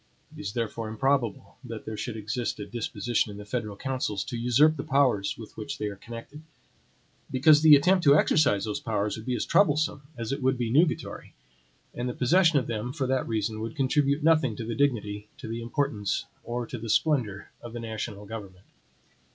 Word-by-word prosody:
It - - -8
is 100 - -4
therefore 115 -1 -3
improbable 115 -3 -1
that 115 -3 -7
there 110 - -5
should 110 +2 -4
exist 110 +2 -3
a 105 - -4
disposition 115 0 -1
in 100 - -8
the 105 - -9
federal 105 -2 -4
councils 130 -7 -2
to - - -6
usurp 125 +7 +4
the - - -4
powers 130 -9 +2
with 110 -2 -11
which 140 +6 -5
they 105 - -2
are 100 - -7
connected; 115 +8 -10 0.9
because 150 +3 +5
the 155 -2 +9
attempt 180 +6 +3
to 140 0 +7
exercise 120 -12 +3
those 105 -1 -3
powers 105 -2 -1
would 110 +2 -9
be 125 - 0
as - - -2
troublesome 150 -6 +2 0.2
as 115 +1 -4
it 140 +1 -2
would 130 0 +2
be 120 -2 -2
nugatory; 155 +6 0 0.6
and 120 +1 -3
the 125 - -5
possession 165 +4 +4
of 130 - +1
them, 115 +1 -3
for 135 0 -2
that 130 0 0
reason, 110 -1 -1
would 115 +1 -5
contribute 140 +1 +1
nothing 155 -8 +3
to 115 - -5
the 115 - -3
dignity, 105 -7 0
to 140 -7 -8
the 115 +1 -4
importance, 115 -4 -1 0.2
or 120 0 -3
to 120 - -7
the 115 0 -6
splendor 115 -7 +1
of 120 -1 -9
the 120 - -5
national 110 -2 -5
government. 100 -4 -9
120 Hz, 200 wpm, -27 LUFS, 110-140 Hz, 0.9 s, the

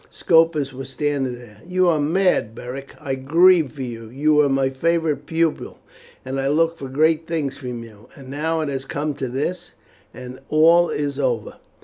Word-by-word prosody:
Scopus 160 -5 +2
was 130 0 -8
standing 135 -2 -2
there. 110 -3 -15
"You 185 +1 +1
are 160 -3 +3
mad, 155 - +1
Beric. 135 +4 -8
I 140 -3 -4
grieve 160 +3 +4
for 140 -3 -6
you. 115 -2 -7
You 145 +5 +1
were 150 -1 +4
my 135 -1 +1
favourite 155 0 0
pupil, 165 -1 -1 0.5
and 135 +1 -3
I 135 - 0
looked 165 +3 +1
for 135 - -6
great 155 +4 +2
things 150 -5 -2
from 125 -3 -6
you, 110 -1 -15
and 135 -2 -13
now 160 +4 -2
it 155 - -2
has 135 -1 -3
come 145 +2 -3
to 135 -1 -4
this, 170 +8 -4 0.4
and 125 0 -10
all 165 +3 +5
is 145 -1 -3
over." 120 -6 -2
145 Hz, 185 wpm, -21 LUFS, 130-160 Hz, 0.5 s, all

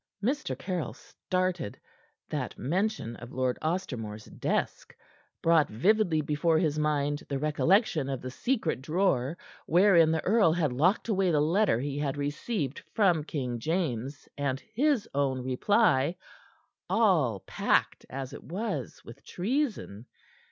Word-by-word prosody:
Mr. 285 +5 -1
Caryll 180 -4 -3
started. 185 -2 -3 0.5
That 140 -6 -4
mention 180 - -1
of 120 - -10 0.3
Ostermore's 125 - -3
desk - - -3 0.5
brought 165 -2 +4
vividly 175 - +2
before 150 +2 +1
his 155 -3 +1
mind 145 -1 0
the 140 - -1
recollection 155 - +2
of 135 -2 -2
the 130 +1 -6
secret 215 - -1
drawer 155 -2 0 0.3
wherein 175 -2 +5
the 160 0 0
earl 200 -5 +4
had 155 -6 0
locked 175 - +2
away 195 -4 +2
the 155 -3 +3
letter 165 - +2
he 140 +2 -3
had 145 -1 -2
received 145 - -2 0.2
from 180 -8 +3
King 125 -6 -3
James 145 -3 -2
and 140 -2 -1
his 275 -1 +2
own 135 -2 0
reply, 140 - +2 0.7
all 160 - +3
packed - - 0
as 135 0 -6
it - - -9
was, 205 +8 -4
with - - -12
treason. 205 - -2
155 Hz, 130 wpm, -29 LUFS, 135-190 Hz, 0.7 s, wherein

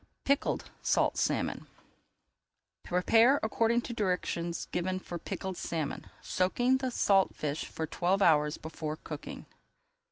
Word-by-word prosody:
PICKLED 280 +1 0
SALT - - +2
SALMON - - -1 1.1
Prepare 225 +9 +4
according 230 +2 +2
to 235 - -6
directions 180 -5 -1
given 185 +1 -1
for 175 -2 -6
Pickled 190 +1 -5
Salmon, 160 -4 -3 0.2
soaking 245 +8 +2
the 260 -1 -2
salt 195 -5 +3
fish 150 0 -3
for 160 - -4
twelve 180 +4 0
hours 150 -3 +4
before 155 -1 -5
cooking. 150 -2 -8
185 Hz, 120 wpm, -30 LUFS, 160-225 Hz, 1.1 s, Prepare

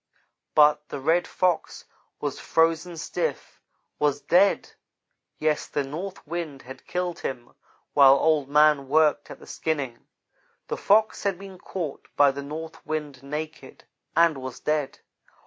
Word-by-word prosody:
"But 150 0 +5
the - - -5
Red 165 +6 +2
Fox 180 -2 -1 0.3
was - - -3
frozen 165 +1 +1
stiff 480 - -4 0.4
was 145 -1 +1
dead. 190 +6 +3 0.7
Yes, 155 -1 0
the 145 - -1
north 175 +9 -7
wind 155 -4 -5
had 130 +1 -12
killed 180 -1 -2
him 120 -3 -6 0.4
while 135 -1 +8
Old 150 -1 +2
man 150 -1 +4
worked 150 0 +3
at - - -9
the - - -15
skinning. 140 -7 -3 0.6
The - - -2
Fox 215 +2 +3
had 195 -3 -1
been 190 -1 -11
caught 170 -8 -6
by 145 -1 +5
the 140 +1 -6
north 155 +3 -7
wind 150 -4 -4
naked, 150 0 -7 0.3
and 165 -4 +4
was 130 -1 -7
dead. 150 -2 -1
155 Hz, 140 wpm, -25 LUFS, 140-170 Hz, 0.7 s, while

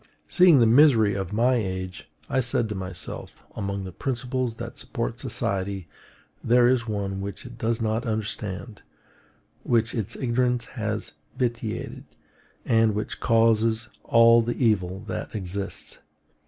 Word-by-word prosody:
Seeing 180 -4 +6
the 115 - +6
misery 115 -4 +5
of 95 -1 -3
my 120 +5 +3
age, 95 -5 -3 0.2
I - - 0
said 120 -2 +1
to - - -2
myself: 95 -2 -7
Among 100 -2 -3
the 95 - -7
principles 125 +2 -2
that - - -7
support - - -4
society, 95 -2 -1 0.6
there 120 +1 +5
is 120 -2 +2
one 100 -2 -3
which 100 +4 -6
it 120 -1 -11
does 115 0 0
not 110 +2 -1
understand, 105 -1 -4 0.8
which 115 -1 +1
its 110 -5 -3
ignorance 125 -1 0
has 110 - -2 0.2
vitiated, 120 -3 -3 0.6
and 115 -2 +3
which 105 - -4
causes 115 -1 +2
all 115 0 +6
the 120 +1 -2
evil 95 -5 +1
that 110 - -6
exists. 100 0 -5
110 Hz, 135 wpm, -25 LUFS, 100-120 Hz, 0.8 s, Seeing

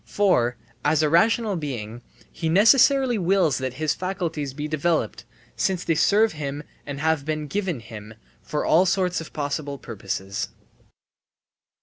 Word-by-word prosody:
For, 125 -13 +1 0.3
as 155 +1 +2
a 150 - +3
rational 220 +5 +3
being, 120 -8 -5 0.3
he 165 - -3
necessarily 250 - +5
wills 180 -6 +2
that 130 -1 -4
his 155 +1 0
faculties 170 -7 -3
be 150 +3 -5
developed, 155 +2 -1 0.3
since 185 -2 0
they 165 - +1
serve 210 +7 +3
him 145 -1 -5 0.2
and 140 -1 -5
have 160 -1 +1
been 155 0 -3
given 180 - -2
him, 110 -1 -10 0.3
for 150 - -3
all 180 +4 +4
sorts 185 -2 +1
of 165 - -10
possible 145 -1 -3
purposes. 100 -5 -4
155 Hz, 140 wpm, -24 LUFS, 140-185 Hz, 0.3 s, necessarily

